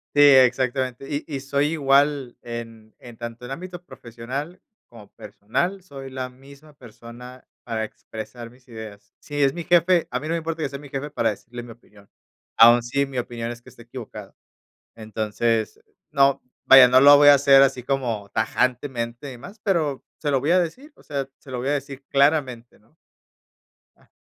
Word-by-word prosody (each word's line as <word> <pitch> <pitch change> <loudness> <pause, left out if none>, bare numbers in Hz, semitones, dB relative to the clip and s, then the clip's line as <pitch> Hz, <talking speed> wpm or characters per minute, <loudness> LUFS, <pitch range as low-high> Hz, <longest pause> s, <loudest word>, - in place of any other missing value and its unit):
Sí, 145 - +5
exactamente. 130 -1 +3
Y 145 0 -3
y 145 -4 -4
soy 140 +2 0
igual 140 -3 +2
en 115 -2 -9
en 120 -1 -13
tanto 120 +1 -8
en 125 - -9
ámbito 175 +4 -8
profesional 130 +6 -8 0.3
como 110 -3 -15
personal, 175 - -4
soy 135 -6 -10
la 130 -1 -5
misma 140 +4 -17
persona 125 0 -13 0.2
para 115 -2 -3
expresar 110 +2 -9
mis 125 +2 -23
ideas. 105 -3 -11
Si 145 -1 -2
es 135 -1 +2
mi 170 - -6
jefe, 175 0 +3
a 125 - -2
mí 150 - -7
no - - -3
me - - 0
importa 165 0 -4
que 145 - -2
sea 140 - -8
mi 145 -1 -13
jefe 140 +2 -5
para 115 - 0
decirle 120 +3 -8
mi 120 - -12
opinión, 105 -3 -22 0.5
aún 120 +1 +8
si 140 +4 -1
mi 135 -2 -5
opinión 120 -1 -5
es 120 0 -10
que - - -16
esté 120 - -16
equivocado. 115 -4 -10 0.6
Entonces, 110 0 -2 0.3
no 140 0 +2 0.2
vaya, 135 -1 +9
no 130 +1 +5
lo 145 +1 +9
voy 145 0 +7
a - - +10
hacer 135 -1 +6
así 135 -2 0
como 120 -6 -3
tajantemente 125 +1 -2
y 120 - -13
más, 190 - -12
pero 160 -9 -1 0.2
se 150 - -2
lo 135 -2 +2
voy 145 +6 0
a 185 - +5
decir, 255 - -5
o - - -21
sea, 140 -2 -4
se - - -17
lo 130 - -4
voy 125 +3 -3
a - - +1
decir 140 -1 -4
claramente, 140 -4 +1
¿no? 110 +9 -31 1.0
Ah. - - -28
130 Hz, 190 wpm, -23 LUFS, 120-145 Hz, 1.0 s, a